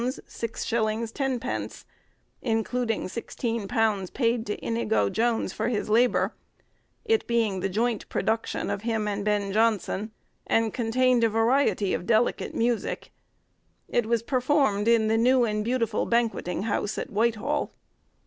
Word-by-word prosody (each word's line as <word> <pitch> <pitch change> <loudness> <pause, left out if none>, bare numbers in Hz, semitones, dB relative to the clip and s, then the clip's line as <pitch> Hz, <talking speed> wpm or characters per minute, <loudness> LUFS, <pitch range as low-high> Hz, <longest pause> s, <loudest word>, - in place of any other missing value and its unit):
_, 230 0 -2 0.6
including 225 0 -1
£16 225 -2 -2
paid 235 -2 +1
to 210 - -2
Inigo 110 -3 +1
Jones, 230 0 0
for 220 - -2
his 225 -3 -1
labour; 240 +3 +3 0.7
it 445 0 +1
being 225 -5 +1
the 195 - -1
joint 225 +3 -1
production 225 +1 -1
of 200 - -3
him 220 -2 -1
and 205 0 -2
Ben 205 -2 0
Jonson, 215 -1 +1 0.4
and 225 -1 +2
contained 250 +1 +2
a 230 - +4
variety 225 -2 +2
of 175 - -3
delicate 230 +1 +1
music. 235 -1 -1 0.8
It 240 -2 0
was 230 -1 +1
performed 255 -5 +1
in 230 -2 +4
the 220 +1 +2
new 250 +2 +4
and 210 -2 0
beautiful 230 -2 0
banquetting 230 -6 0
house, 205 -1 -1
at - - -4
Whitehall. 225 +5 0
225 Hz, 130 wpm, -26 LUFS, 210-240 Hz, 0.8 s, a